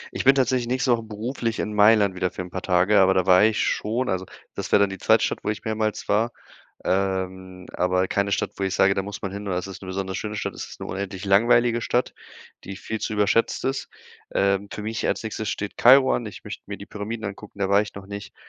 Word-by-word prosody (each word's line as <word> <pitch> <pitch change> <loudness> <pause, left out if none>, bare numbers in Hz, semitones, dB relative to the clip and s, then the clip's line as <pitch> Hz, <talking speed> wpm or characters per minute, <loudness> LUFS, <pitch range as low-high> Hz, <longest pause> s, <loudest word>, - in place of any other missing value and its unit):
Ich - - -3
bin 135 +1 +7
tatsächlich 130 -2 +1
nächste 130 +1 +1
Woche 115 -1 +2
beruflich 110 +2 -4
in 105 - -3
Mailand 105 -2 +5
wieder 95 0 -1
für 90 - -6
'n 90 - -11
paar 95 - -4
Tage, 95 +3 +3
aber 95 0 +5
da 95 -1 +2
war 95 +2 +6
ich 110 -1 +1
schon. 115 +4 0
Also, 95 -1 -2 0.3
das - - -6
wär - - +7
dann 100 -1 +2
die 95 - -7
zweite - - +4
Stadt, - - -3
wo - - -2
ich 105 - -3
mehrmals 110 -1 -2
war. 115 +3 +2 0.5
Ähm, 95 -1 -2
aber 90 +1 +1
keine 100 -1 0
Stadt, - - -1
wo 100 - -2
ich 95 -1 -1
sage, 95 +1 +4
da 95 - -1
muss 105 +1 -7
man 95 -1 -4
hin 100 0 -6
oder 90 -2 -1
es 90 - -5
ist 95 0 -9
'ne - - -8
besonders 95 0 -3
schöne 105 -1 -4
Stadt. - - -3
Es - - -6
ist - - -13
'ne - - -5
unendlich 95 0 -5
langweilige 120 +3 +4
Stadt, 125 +1 0 0.5
die 95 0 -7
viel 110 +2 -5
zu - - -3
überschätzt 105 +4 +1
ist. 135 0 -3 0.4
Ähm, 100 +1 +1
für - - -6
mich 110 +1 -3
als - - -1
Nächstes 110 -1 -3
steht 105 -1 -5
Kairo 130 +2 +6
an. 120 - -2
Ich 105 - -9
möchte 105 - -8
mir 100 - -6
die 100 - -10
Pyramiden 105 +1 -5
angucken, 100 +1 -9
da 100 -1 0
war 100 +1 +4
ich 105 - -9
noch 100 0 -9
nicht. 100 0 -8
100 Hz, 250 wpm, -24 LUFS, 95-110 Hz, 0.5 s, bin